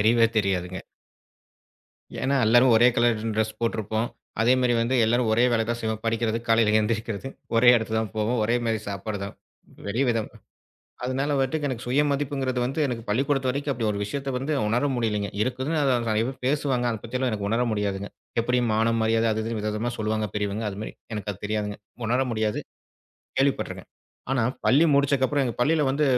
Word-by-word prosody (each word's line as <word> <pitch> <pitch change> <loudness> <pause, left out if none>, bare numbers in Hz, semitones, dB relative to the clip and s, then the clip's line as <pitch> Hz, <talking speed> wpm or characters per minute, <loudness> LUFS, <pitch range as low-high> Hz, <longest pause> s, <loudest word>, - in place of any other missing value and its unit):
தெரியவே 115 +2 +5
தெரியாதுங்க. 95 -2 -1 1.4
ஏன்னா 140 +1 +2
எல்லாரும் 120 +2 +6
ஒரே 120 +2 +6
கலர் 120 -2 +3
டிரெஸ் 110 0 -1
போட்டிருப்போம். 110 0 -1 0.3
அதே 120 +3 +5
மாதிரி 125 -1 +2
வந்து 115 +3 0
எல்லாரும் 120 +1 +2
ஒரே 115 +3 +4
வேலைதான் 115 +1 0
செய்வோம். 110 -1 -2
படிக்கிறது 115 0 0
காலையில 115 -2 +4
எந்திருக்கிறது 110 +2 -2 0.3
ஒரே 120 +2 +5
இடத்துக்கு 110 -1 0
தான் 110 -4 -4
போவோம். 110 +3 0
ஒரே 115 +2 +1
மாரி 115 -1 0
சாப்பாடுதான். 100 0 -5 0.5
வெளி 110 +7 0
விதம். 115 -3 0 0.8
அதனால 135 +3 -1
வன்ட்டு 135 +3 +1
எனக்கு 125 -3 -4
சுயமதிப்புங்கறது 140 -1 0
வந்து 135 +5 -2
எனக்கு 120 -3 -4
பள்ளிக்கூடத்து 135 +3 +1
வரைக்கும் 140 +2 -1
அப்படியொரு 110 -4 -1
விஷயத்தை 135 +6 -3
வந்து 135 +4 -2
உணர 120 +6 +1
முடியலைங்க. 105 -4 -1
இருக்குதுன்னு 130 +6 -1 0.3
நெறைய 110 +1 +2
பேர் 130 - -6
பேசுவாங்க. 135 -3 +1
அது 110 - -4
பத்திலாம் 125 +2 -1
எனக்கு 100 -2 -2
உணர 115 +3 +2
முடியாதுங்க. 100 -1 -2 0.3
எப்படி 125 +2 +1 0.2
மானம் 115 +1 +2
மரியாதை 115 +1 +2
அது 110 0 -1
இதுன்னு 115 0 -3
வித 105 +1 -2
விதமா 115 +3 -2
சொல்லுவாங்க 110 0 -1
பெரியவங்க. 105 +1 -2
அது 100 - -8
மாதிரி - - -6 0.2
எனக்கு 105 -1 -4
அது 100 - -11
தெரியாதுங்க. 105 -1 -2 0.3
உணர 120 +3 +1
முடியாது. 110 -2 -1 0.8
கேள்விப்பட்டிருக்கேன். 135 0 -1 0.4
ஆனா, 130 -3 +2 0.2
பள்ளி 145 +6 +5
முடிச்சக்கு 140 -1 +3
அப்புறம் 145 +1 0
எங்க 120 - -2
பள்ளியில 155 +5 +3
வந்து 145 +3 +1
115 Hz, 165 wpm, -25 LUFS, 110-130 Hz, 1.4 s, எல்லாரும்